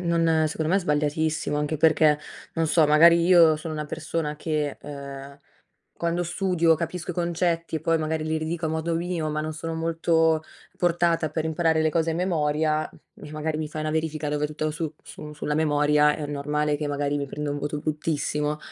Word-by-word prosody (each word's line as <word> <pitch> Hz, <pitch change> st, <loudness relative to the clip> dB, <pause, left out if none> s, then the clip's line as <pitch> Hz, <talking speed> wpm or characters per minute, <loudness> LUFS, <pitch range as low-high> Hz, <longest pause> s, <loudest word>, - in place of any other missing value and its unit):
non 165 Hz, -2 st, +2 dB
secondo 155 Hz, +1 st, -2 dB
me 190 Hz, -, +4 dB
è -, -, +2 dB
sbagliatissimo 150 Hz, -1 st, 0 dB
anche 150 Hz, +1 st, -1 dB
perché, 155 Hz, -1 st, +4 dB, 0.4 s
non 165 Hz, -1 st, +1 dB
so 155 Hz, 0 st, +4 dB
magari 170 Hz, +3 st, +6 dB
io 170 Hz, -3 st, +6 dB
sono 155 Hz, +1 st, -6 dB
una 150 Hz, -1 st, -4 dB
persona 155 Hz, -1 st, -3 dB
che, 150 Hz, -2 st, -2 dB
ehm, 140 Hz, -1 st, -9 dB, 0.6 s
quando 170 Hz, +1 st, -1 dB
studio 175 Hz, -1 st, +2 dB
capisco 170 Hz, +2 st, -4 dB
i -, -, -15 dB
concetti 170 Hz, -1 st, -1 dB
e -, -, -4 dB
poi 165 Hz, +1 st, +2 dB
magari 155 Hz, 0 st, -2 dB
li 155 Hz, 0 st, -1 dB
ridico 160 Hz, +1 st, -2 dB
a -, -, -1 dB
modo 160 Hz, +1 st, -1 dB
mio, 165 Hz, -2 st, -2 dB
ma 155 Hz, 0 st, -2 dB
non 155 Hz, 0 st, -4 dB
sono 165 Hz, +1 st, -5 dB
molto 165 Hz, -1 st, +1 dB, 0.3 s
portata 170 Hz, -2 st, +1 dB
per 160 Hz, +1 st, -2 dB
imparare 160 Hz, 0 st, +1 dB
le 155 Hz, -, +3 dB
cose 165 Hz, +1 st, 0 dB
a -, -, -1 dB
memoria, 155 Hz, -3 st, 0 dB
e 150 Hz, -, -15 dB
magari 155 Hz, 0 st, -2 dB
mi 155 Hz, -1 st, -3 dB
fai 155 Hz, 0 st, -6 dB
una 155 Hz, -, -2 dB
verifica 155 Hz, -1 st, -2 dB
dove 150 Hz, 0 st, -1 dB
tutto 155 Hz, +1 st, -3 dB
su 155 Hz, 0 st, -4 dB
su 150 Hz, 0 st, -10 dB
sulla 150 Hz, 0 st, -3 dB
memoria, 150 Hz, -1 st, +3 dB
è 150 Hz, -, -5 dB
normale 150 Hz, +1 st, -1 dB
che 145 Hz, 0 st, -3 dB
magari 145 Hz, 0 st, -1 dB
mi 140 Hz, -, -2 dB
prendo 145 Hz, +1 st, -4 dB
un 145 Hz, -, -3 dB
voto 145 Hz, +1 st, -3 dB
bruttissimo, 150 Hz, -1 st, -2 dB
155 Hz, 195 wpm, -25 LUFS, 150-165 Hz, 0.6 s, magari